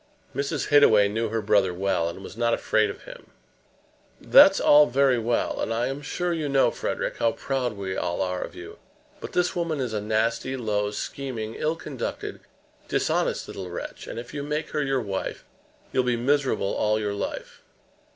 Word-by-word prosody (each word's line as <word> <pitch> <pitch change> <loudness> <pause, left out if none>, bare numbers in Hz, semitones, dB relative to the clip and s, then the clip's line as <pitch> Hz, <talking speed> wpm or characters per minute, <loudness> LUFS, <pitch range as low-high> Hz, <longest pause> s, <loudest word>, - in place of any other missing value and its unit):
Mrs. 140 +1 -2
Hittaway 110 -9 +6
knew 110 +2 -1
her 110 0 -2
brother 95 -3 +2
well, 90 -3 0
and 95 +3 -9
was - - -9
not 115 0 +2
afraid - - +1
of - - -8
him. - - -12 0.9
"That's - - +7
all 150 0 +7
very 130 0 +3
well; 115 +1 -1
and - - -2
I 120 +3 0
am 135 +2 -5
sure 175 +4 -2
you 155 -3 -2
know, 135 -1 +3
Frederic, - - -3
how 115 - +2
proud 130 -4 -2
we 95 -2 -4
all 85 - -2
are 90 -1 -2
of - - -6
you. - - -10 0.4
But - - -8
this 180 0 +1
woman 170 -4 -1
is 125 -4 -2
a 105 - -1
nasty, 115 +5 0
low, 105 -4 -1
scheming, 115 0 -5
ill 155 +6 -1
conducted, 140 -6 -5 0.5
dishonest - - 0
little 95 -2 -7
wretch; 85 - -7
and - - -7
if 120 +3 -7
you 145 - -3
make 150 +2 -3
her 150 - 0
your 135 -2 0
wife 100 -4 -4 0.5
you'll 130 - +2
be 125 -1 +1
miserable 135 -5 +1
all 110 0 +1
your 105 -1 -2
life. 100 - -5
120 Hz, 185 wpm, -25 LUFS, 105-140 Hz, 0.9 s, That's